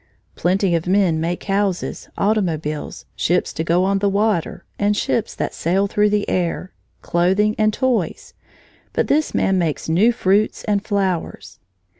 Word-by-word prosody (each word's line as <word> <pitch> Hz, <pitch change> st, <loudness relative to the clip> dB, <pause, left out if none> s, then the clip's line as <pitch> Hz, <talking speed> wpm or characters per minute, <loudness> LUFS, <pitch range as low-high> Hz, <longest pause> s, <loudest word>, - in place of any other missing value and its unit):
Plenty 185 Hz, +1 st, +1 dB
of 170 Hz, +1 st, -1 dB
men 185 Hz, -4 st, +2 dB
make 170 Hz, +2 st, -2 dB
houses, 195 Hz, -2 st, -2 dB
automobiles, 165 Hz, -8 st, -1 dB
ships 180 Hz, +2 st, 0 dB
to 160 Hz, -, -2 dB
go 170 Hz, +2 st, +2 dB
on 195 Hz, +1 st, +1 dB
the 200 Hz, 0 st, +2 dB
water, 205 Hz, -3 st, 0 dB
and 205 Hz, 0 st, +1 dB
ships 225 Hz, +1 st, -1 dB
that -, -, -3 dB
sail 190 Hz, +4 st, +1 dB
through 210 Hz, +1 st, +2 dB
the 205 Hz, 0 st, 0 dB
air, 180 Hz, +1 st, -2 dB, 0.3 s
clothing, 190 Hz, +5 st, +2 dB
and 215 Hz, 0 st, +3 dB
toys, 235 Hz, -5 st, -1 dB, 0.6 s
but -, -, +1 dB
this 305 Hz, +2 st, +1 dB
man 190 Hz, -1 st, +2 dB
makes 165 Hz, -4 st, -2 dB
new 185 Hz, +9 st, +4 dB
fruits 210 Hz, -2 st, +1 dB
and 205 Hz, -2 st, 0 dB
flowers. 195 Hz, -5 st, -2 dB
195 Hz, 150 wpm, -20 LUFS, 175-210 Hz, 0.6 s, new